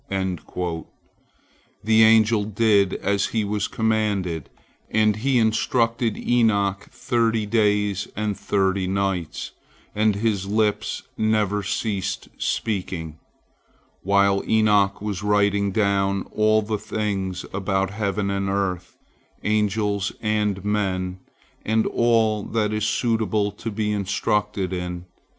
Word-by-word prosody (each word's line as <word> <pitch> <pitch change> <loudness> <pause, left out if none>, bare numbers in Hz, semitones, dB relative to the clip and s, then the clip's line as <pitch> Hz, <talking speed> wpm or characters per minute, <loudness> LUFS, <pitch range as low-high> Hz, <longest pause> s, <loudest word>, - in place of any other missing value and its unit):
The 90 -3 -3 1.2
angel 110 -1 +5
did 105 -2 +2
as 100 +1 0
he 110 -2 -1
was 105 0 -1
commanded, 105 - -1 0.4
and 110 -1 +2
he 130 +3 +1
instructed 115 +1 +1
Enoch 100 -5 +1
thirty 115 -4 0
days 105 -2 +1
and 105 -1 -1
thirty 95 -1 0
nights, 95 -3 -2 0.4
and 105 -1 +2
his 100 -2 -1
lips 105 0 0 0.2
never 105 -2 +1
ceased 100 0 -3
speaking, 90 -7 -3 0.8
while 100 0 +3
Enoch 105 -2 +3
was 105 -3 -3
writing 100 -1 +2
down 100 -1 +1
all 110 0 +3
the 105 0 -2
things 100 -4 -3
about 95 0 -1
heaven 100 -1 -1
and 100 0 -1
earth, 95 -2 -2 0.5
angels 105 -1 0
and 105 -3 -1
men, 95 -3 -1 0.4
and 110 +1 +1
all 115 -3 +2
that 105 0 -1
is 105 0 0
suitable 110 -4 0
to 105 +3 -6
be 105 0 -2
instructed 100 -1 -1
in. 90 -1 -4
105 Hz, 110 wpm, -23 LUFS, 95-110 Hz, 1.2 s, angel